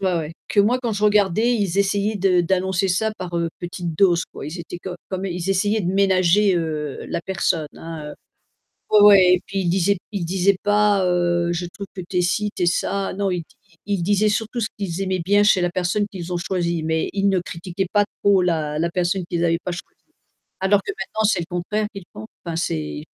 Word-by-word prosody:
ouais 185 -2 +1
ouais, 160 -1 -3 0.2
que 205 - +3
moi 240 +5 +3
quand 235 -3 -2
je 205 +1 -3
regardais, 210 +3 +3
ils 195 -3 -1
essayaient 200 +2 +1
de 185 -2 +3
d'annoncer 190 +2 0
ça 195 +4 +1
par, 175 -2 -4
heu, 170 -1 0
petites 175 -2 -5
doses 175 -4 +4
quoi. - - -8
Ils 170 +3 -6
étaient 175 +1 -8
comme 180 0 -6
comme 190 0 -4
ils 180 +1 -3
essayaient 205 +3 +1
de 180 0 -1
ménager, 195 0 +3
heu, 155 -4 -3
la - - -2
personne, 170 -4 -1
hein, 165 -2 -8
heu. - - -9 0.8
Ouais 210 -1 +6
ouais, 200 -2 +8
et 180 - +2
puis 195 - -3
ils 175 - 0
disaient 190 +2 +2
ils 195 -5 -3
disaient 190 +3 +2
pas, 205 -1 +3
heu: 175 -1 +1
«Je 175 +1 -3
trouve 200 0 -7
que 185 - -5
tu 180 - -3
es - - +4
ci, 205 +4 0
tu 180 - -1
es - - +3
ça». 195 +2 0
Non, 195 -1 -1
ils-ils 180 +2 -5
disaient 205 +3 +2
surtout 225 +3 -2
ce 220 - 0
qu'ils 195 -2 -3
aimaient 185 -2 -1
bien 205 +2 +4
chez 205 -2 +4
la 175 0 0
personne 185 +4 0
qu'ils 180 -3 -7
ont 175 - 0
choisie 170 -2 -1
mais 160 0 0
ils 200 0 +1
ne 190 -2 +2
critiquaient 175 +3 -4
pas 205 -1 +3 0.2
trop 200 -2 +4
la 155 -4 -1
la 170 +1 0
personne 180 +1 0
qu'ils 170 -1 -1
avaient 165 -1 +2
pas 180 - -3
choisie. 175 - -9 0.6
Alors 195 +1 +3
que - - -4
maintenant 205 +3 -4
c'est 205 -3 +3
le 170 - -5
contraire 195 +5 -2
qu'ils 195 - -8
font? 110 0 -9 0.2
Enfin 165 -1 -4
c'est. 75 - -3
185 Hz, 225 wpm, -22 LUFS, 170-200 Hz, 0.8 s, ouais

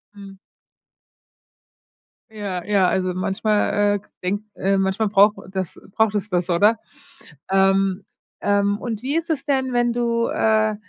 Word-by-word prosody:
Mhm. 195 -1 -12 1.9
Ja, 200 -4 -4
ja, 200 -3 +3
also, 185 0 0
manchmal, 195 +3 0 0.2
äh, - - -2 0.2
denkt, 200 +3 -2
äh 195 +1 +1
manchmal 195 +3 0
braucht 205 +1 +4
das 190 -3 -4 0.2
braucht 220 -2 +2
es 205 +1 -2
das, 180 -1 -1
oder? 205 +6 +4 0.7
Ähm 195 0 +2 0.4
ähm. 205 0 +1
Und 225 -3 -4
wie 270 +4 -2
ist 330 0 -1
es 300 -4 -2
denn, 265 -3 0
wenn 240 -1 +2
du, 235 -1 0
äh, 215 -1 +1
205 Hz, 140 wpm, -21 LUFS, 195-225 Hz, 1.9 s, braucht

